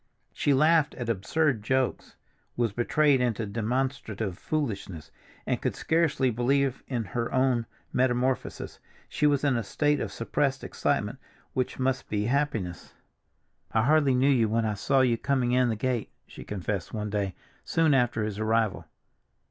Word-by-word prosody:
She 145 - +1
laughed 155 +2 +4
at 120 -3 -5
absurd 120 +5 +1
jokes, 130 +4 -1 0.4
was 115 -4 +1
betrayed 135 +4 +3
into 115 -3 0
demonstrative 110 -2 -2
foolishness, 100 - -4 0.3
and - - -1
could - - -1
scarcely 160 -6 +1
believe 135 +3 +1
in 120 -4 -2
her 115 +4 -3
own 130 -3 +2 0.3
metamorphosis. 125 0 0 0.3
She 150 - +1
was 145 -1 +2
in 140 -3 +2
a 115 - 0
state 145 +7 0
of - - -3
suppressed - - -1
excitement - - -1 0.3
which 130 -1 -2
must 130 0 -1
be 105 0 -1
happiness. 115 -9 -2 0.8
"I 110 - +3
hardly 145 -1 +4
knew 130 +2 +3
you 120 -6 +3
when 115 +1 +1
I 110 - 0
saw 130 +6 +2
you 120 -3 +2
coming 130 -3 +1
in 125 0 +3
the 115 - 0
gate," 120 +1 -1 0.2
she - - -11
confessed 100 -1 -4
one 105 -1 -3
day 100 -3 -1 0.3
soon 160 -2 +2
after 120 -4 +2
his 105 -1 -4
arrival. 110 -1 0
125 Hz, 155 wpm, -27 LUFS, 110-135 Hz, 0.8 s, laughed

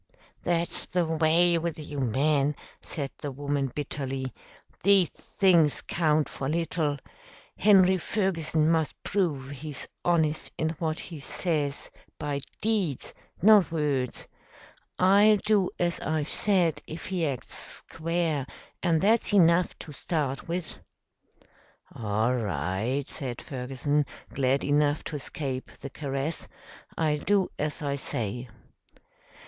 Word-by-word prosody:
"That's 170 0 0
the 180 -1 +1
way 165 +2 +3
with 170 -1 -3
you 150 -2 -6
men," 140 +4 +2 0.3
said 140 -3 -4
the 145 - -4
woman 140 0 -1
bitterly. 135 -2 -4 0.5
"These 195 -1 +5
things 170 -7 +2
count 155 -2 +1
for 135 - -4
little. 160 -2 0 0.6
Henry 190 -2 +5
Ferguson 165 -6 +1
must 160 -2 +1
prove 150 -9 -1
he's 145 0 -6 0.2
honest 160 -3 +1
in 160 - 0
what 160 -1 -1
he 165 -4 -7
says 145 -1 -2 0.3
by 145 -2 -2 0.2
deeds, 205 - -1 0.3
not 210 -5 +7
words. 145 -6 -1 0.7
I'll 205 +3 +6
do 205 -2 +2
as 175 -1 0
I've 155 -1 -1
said 180 -6 +2
if 160 +1 -7
he 185 -3 -1
acts 135 -4 -5
square, 165 -4 -2 0.3
and 165 -3 +2
that's 220 +4 +3
enough 175 -2 +4
to 155 - -9
start 140 -2 -2
with." 170 -1 -4 1.1
"All 110 +2 0
right," 105 - -1
said 125 -4 -5
Ferguson, 135 +3 -1 0.3
glad 135 0 +1
enough 145 +1 +2
to 155 - -5
escape 135 -2 -4
the 140 - -8
caress. 140 +2 -3 0.5
"I'll 150 -2 +1
do 200 +2 +2
as 150 +1 -2
I 140 -1 -1
say." 120 -1 -3
155 Hz, 120 wpm, -27 LUFS, 140-175 Hz, 1.1 s, not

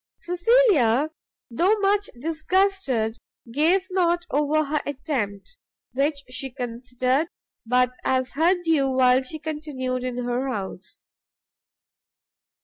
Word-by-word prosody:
Cecilia, 345 - +3 0.4
though 365 - +3
much 405 0 +1
disgusted, 315 - 0 0.3
gave 335 +9 +3
not 345 -2 +1
over 300 +2 +2
her 295 +1 -1
attempt, 270 - -4 0.4
which 280 +2 0
she 255 +1 -5
considered 250 +3 -1 0.4
but 250 +1 +3
as 260 -1 0
her 330 +6 +3
due 310 -5 +2
while 255 0 +4
she 265 +4 -7
continued 295 -5 -4
in 250 -1 -3
her 245 +2 -1
house. 190 - -6
280 Hz, 105 wpm, -24 LUFS, 250-330 Hz, 0.4 s, while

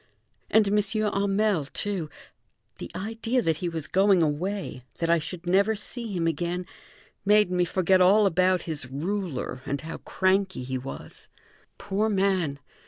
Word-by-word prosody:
And 215 -1 +4
M. 210 +1 +3
Hamel, 205 -4 +1
too; 180 +1 -3 0.7
the - - -6
idea 225 +4 -1
that 160 -2 +1
he 175 +1 -2
was 160 -3 -4
going 190 -2 +4
away, 160 -2 -2
that 165 0 0
I 170 - +4
should 175 +2 -6
never 200 +5 +3
see 230 +2 -6
him 175 -4 -1
again, 175 +3 -1 0.6
made 210 -2 +4
me 180 -1 +2
forget 185 +1 +2
all 200 +4 +6
about 185 -1 +2
his 150 -5 -5
ruler 160 -2 -3
and 140 0 -3
how 160 +1 -6
cranky 190 -5 0
he 130 +1 -3
was. 135 +2 -9 0.5
Poor 210 +3 -1
man! 190 -7 +1
185 Hz, 150 wpm, -26 LUFS, 165-205 Hz, 0.7 s, all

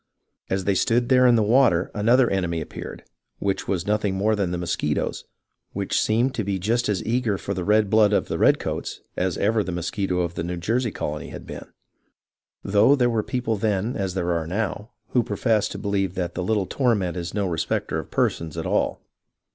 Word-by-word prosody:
As 95 0 0
they 100 - +2
stood 120 +4 +1
there 130 -1 +6
in 120 - +5
the 110 - +3
water 105 -6 +3
another 120 +4 +4
enemy 90 -5 -1
appeared, - - -8 0.3
which 95 -1 -2
was 95 -2 -1
nothing 105 -2 0
more 105 +3 +2
than 100 -4 -1
the 90 - -2
mosquitoes, 85 -4 -2 0.5
which - - 0
seemed 120 +5 +1
to 115 - -2
be 100 -1 -1
just 115 +6 0
as 100 -4 -1
eager 115 -3 0
for 100 - -4
the 90 -2 -3
red 105 +2 +3
blood 110 -1 +5
of 105 - +1
the - - -3
red - - +5
coats - - -4
as 90 -1 -1
ever 110 +1 +2
the 95 - -4
mosquito 90 +1 -1
of 85 -1 -2
the 85 +1 -3
Jersey 115 +8 0
colony 75 -6 -5
had - - -9
been, - - -8 1.0
though 105 +7 +4
there 125 -3 +2
were 115 -2 +1
people 115 -1 -2
then 105 +3 0
as 95 -3 -2
there 90 -2 0
are 85 -2 -1
now 105 +3 -3 0.2
who 125 - +3
profess 110 0 +1
to - - -6
believe 95 -3 -1
that 90 -2 -2
the - - -3
little 105 0 +1
torment 105 - 0
is 85 +1 -5
no 100 -1 0
respecter 80 -3 -1
of - - -8
persons 80 -2 -1
at - - -3
all. - - 0
100 Hz, 205 wpm, -24 LUFS, 90-115 Hz, 1.0 s, there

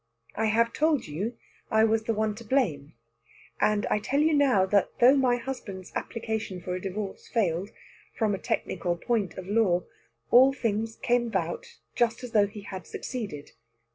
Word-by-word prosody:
I 220 - 0
have 230 +2 +2
told 305 -3 +2
you 200 +11 -4 0.3
I 220 0 +4
was 220 0 +2
the 230 - +1
one 215 0 0
to 225 +3 -10
blame, 180 - 0 0.6
and 210 -1 +2
I - - +1
tell 255 +7 0
you 310 +1 +3
now 265 -10 +4
that 200 +1 +2
though 250 +3 +7
my 255 -3 +3
husband's 230 -7 -6
application 220 -5 -3
for 180 +1 -4
a 180 - -3
divorce 195 +1 -5
failed, 195 -4 0 0.5
from 215 -3 +1
a 195 - -2
technical 175 -2 -2
point 210 -2 -1
of 185 - -6
law, 195 -4 +2 0.5
all 260 +2 +7
things 225 -3 -2
came 240 0 +1
about 475 - -3 0.2
just 235 0 +1
as 245 - -6
though 210 -2 +4
he 205 +1 -9
had 190 -3 -8
succeeded. 200 - -6
220 Hz, 170 wpm, -27 LUFS, 195-245 Hz, 0.6 s, though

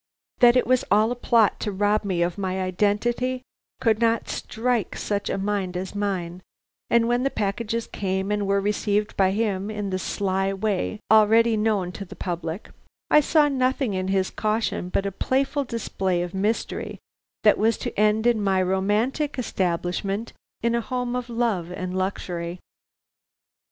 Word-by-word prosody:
That 240 0 +7
it 250 - +3
was 255 0 +2
all 215 +3 +4
a - - -1
plot 230 -3 +3
to 210 - -2
rob 205 +2 +1
me 185 -4 0
of 175 0 -1
my 190 -1 -2
identity 215 +7 0 0.4
could 220 -2 +2
not 230 -1 +1
strike 235 -2 -1
such 205 -1 -2
a - - -1
mind 195 -2 -2
as 185 +1 -5
mine, 185 -4 -3 0.5
and 235 0 +4
when 240 +1 +2
the 270 - +1
packages 225 +1 -2
came 190 0 -2
and 205 -1 0
were 200 0 +2
received 210 +1 0
by 190 -1 +3
him 200 -1 -1
in 205 -2 -4
the 185 - -1
sly 195 0 -1
way 210 +1 -2
already 220 +1 +5
known 210 -4 0
to 200 - -7
the 185 - -11
public, 170 +1 -5 0.4
I - - +8
saw 300 0 +4
nothing 260 -4 0
in 185 0 -2
his 190 -1 +1
caution 215 -4 -1
but 195 - 0
a 200 - -1
playful 270 +7 0
display 190 -6 -1
of 175 - -6
mystery 205 +4 -2 0.5
that 210 - +5
was 225 +1 +2
to - - -4
end 215 +2 +2
in 235 -3 +3
my 190 -1 +2
romantic 210 +11 0
establishment 195 0 -2 0.3
in 235 0 +2
a 235 - +1
home 250 0 -3
of 250 -1 -4
love 225 -8 -1
and 185 0 -4
luxury. 180 -2 -3
205 Hz, 165 wpm, -24 LUFS, 190-230 Hz, 0.5 s, I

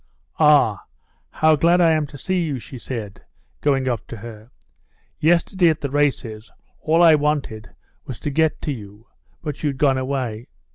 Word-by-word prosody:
"Ah, 145 -9 +4 0.4
how 155 0 +3
glad 170 +4 +3
I 170 -2 +5
am 155 -2 +1
to 145 - -11
see 185 +5 -1
you!" 150 -5 -2
she 125 +1 -10
said, 110 -6 -7 0.4
going 135 -2 +1
up 120 -4 -2
to 115 - -8
her. 110 0 -11 0.7
"Yesterday 175 +2 +3
at 155 - -1
the 140 - -3
races 130 -7 -1 0.3
all 165 +2 +2
I 165 -2 +8
wanted 145 -7 -1 0.4
was 130 - -7
to 145 - -3
get 160 +1 +1
to 150 - -2
you, 105 -3 -10 0.4
but 150 -3 -5
you'd 145 -3 -1
gone 135 -2 +2
away. 130 -4 -3
140 Hz, 165 wpm, -21 LUFS, 115-155 Hz, 0.7 s, I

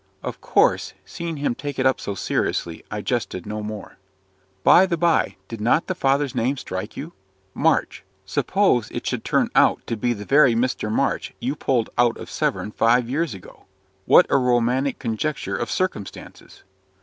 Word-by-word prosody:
Of - - -6
course, - - +2
seeing 170 -2 -5
him 140 -3 0
take 145 +2 -6
it 130 - 0
up 130 - +3
so 100 - -4
seriously, 85 -2 -2
I 105 - -4
jested 105 -6 -3
no 105 0 -4
more. 105 -1 -8 0.6
"By 190 +2 +7
the 170 -2 -1
by, 170 0 +2
did 115 -2 -7
not 125 +8 +2
the 185 - -2
father's 140 -4 +1
name 130 +5 0
strike 95 -2 -6
you? 160 +5 -7 0.4
MARCH - - +1 0.2
suppose - - +1
it - - -6
should - - -2
turn - - +1
out - - +3
to 115 - -2
be 120 +2 0
the 105 -2 -8
very 135 -3 +5
Mr. 115 -3 -1
March - - -1
you 135 +4 -2
pulled 125 -6 0
out 120 -1 +3
of - - -9
Severn 105 - -1
five 120 +2 +2
years 150 -4 -1
ago. 95 - -15 0.4
What - - +7
a - - +5
romantic 125 +1 +1
conjuncture 130 +5 -3
of 120 - -3
circumstances?" 185 - -5
125 Hz, 175 wpm, -22 LUFS, 110-145 Hz, 0.6 s, By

